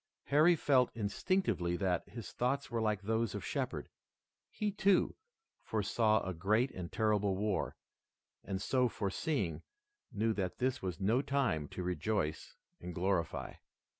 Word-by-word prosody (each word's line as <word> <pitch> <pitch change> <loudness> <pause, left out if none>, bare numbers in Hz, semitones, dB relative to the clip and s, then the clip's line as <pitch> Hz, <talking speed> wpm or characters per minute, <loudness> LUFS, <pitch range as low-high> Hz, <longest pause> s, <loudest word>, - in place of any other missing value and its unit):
Harry 155 +5 +5
felt 135 -5 +3
instinctively 105 - 0
that 90 -3 0
his 110 -5 -7
thoughts 135 +2 -1
were 115 -1 0
like 105 -3 0
those 110 0 0
of - - -4
Shepard. - - -2 0.6
He, 210 -1 -2
too, 195 -1 +3 0.5
foresaw 110 0 +1
a 95 - -2
great 110 +9 +2
and 90 -2 -6
terrible 105 -3 +2
war, 105 -1 -1 0.7
and, 95 -1 -3
so 125 +4 +2
foreseeing, 100 - -1 0.5
knew 110 0 +1
that 95 -4 -2
this 130 +1 0
was 90 -1 -3
no 110 +7 +3
time 130 - 0
to 90 - -5
rejoice 90 -3 -1 0.2
and 90 -1 -7
glorify. 90 -2 -1
105 Hz, 135 wpm, -34 LUFS, 95-125 Hz, 0.7 s, Harry